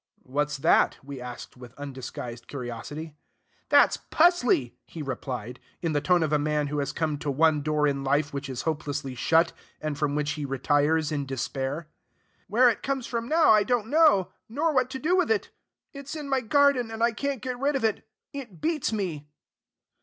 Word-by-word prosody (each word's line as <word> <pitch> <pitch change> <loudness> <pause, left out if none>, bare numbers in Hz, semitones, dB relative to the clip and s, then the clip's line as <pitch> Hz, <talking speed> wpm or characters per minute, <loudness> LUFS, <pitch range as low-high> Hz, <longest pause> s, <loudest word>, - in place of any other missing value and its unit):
"What's 150 +2 -1
that?" 135 - +3
we 135 -1 -8
asked 125 -1 -8
with 125 0 -12
undisguised 130 -4 -7
curiosity. 145 +5 -6 0.6
"That's - - +5
'pusley'!" 250 - +2
he 160 - -7
replied, 125 -3 -5 0.2
in 165 -3 -1
the 145 - +1
tone 175 +2 +3
of 155 -1 -1
a 150 - +4
man 150 0 0
who 150 0 -2
has 140 - -1
come 155 -3 -2
to 145 - -3
one 150 +2 +3
door 150 0 +1
in 140 -1 0
life 145 +2 +1
which 140 0 -4
is 130 -2 -4
hopelessly 145 -3 -3
shut, 165 +6 +2 0.3
and 155 -1 -3
from 145 -1 -1
which 150 0 0
he 150 -1 -4
retires 145 +3 +1
in 145 -2 -2
despair. 135 +3 -3 0.6
"Where 240 +6 +5
it 230 - +1
comes 270 -2 -2
from 235 +2 -4
I 310 -10 +6
don't 230 0 0
know, 300 - +5 0.2
nor 305 +7 0
what 255 -2 +2
to 265 - -5
do 315 +7 +1
with 365 -2 +2
it. 445 - 0 0.4
It's 280 +1 -7
in 300 -2 -5
my 270 -1 +1
garden; 275 -1 +3
and 225 0 -3
I 235 - +4
can't 275 +2 -3
get 250 -1 -4
rid 280 +2 +1
of 265 - -1
it. 220 -2 0 0.3
It 245 -11 -8
beats 310 -5 0
me." 170 -9 -3
155 Hz, 190 wpm, -27 LUFS, -, 0.6 s, I